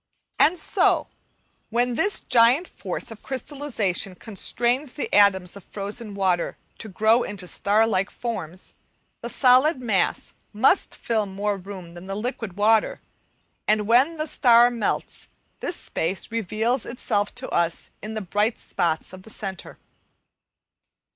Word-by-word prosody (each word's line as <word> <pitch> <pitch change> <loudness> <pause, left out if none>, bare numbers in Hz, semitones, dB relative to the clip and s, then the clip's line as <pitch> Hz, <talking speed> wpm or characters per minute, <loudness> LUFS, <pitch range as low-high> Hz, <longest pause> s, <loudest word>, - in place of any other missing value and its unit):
And 350 +4 +5
so, - - +2 0.6
when 245 +2 +1
this 395 - +3
giant 250 +7 +4
force - - -5
of 220 - -10
crystallization 255 - -2
constrains 240 +7 -1
the 290 - -5
atoms 190 -3 +4
of 200 - -11
frozen 205 +1 -5
water 185 -3 0 0.2
to 220 - -6
grow 220 +5 +3
into 200 -5 -5
star 210 +5 +2
like 195 -3 0
forms, 185 -7 -6 0.5
the 235 - -5
solid 260 +4 +4
mass 215 -7 0 0.2
must 260 - +2
fill 220 -3 -1
more 200 +2 -2
room 185 -3 -9
than 175 +2 -11
the 195 - -4
liquid 225 -2 -4
water, 215 +1 +3 0.7
and 210 -1 +2
when 260 +8 +4
the 310 - -1
star 240 -5 +5
melts, 235 -3 -3 0.3
this 350 - -2
space 185 - -2
reveals 230 +3 -1
itself 205 -4 -2
to - - -5
us 170 -1 -1
in 215 +1 -6
the 215 - -2
bright 205 +4 0
spot 170 -2 -2
of 185 - -10
the 220 - -15
centre. 195 -4 -6
215 Hz, 140 wpm, -24 LUFS, 195-245 Hz, 0.7 s, And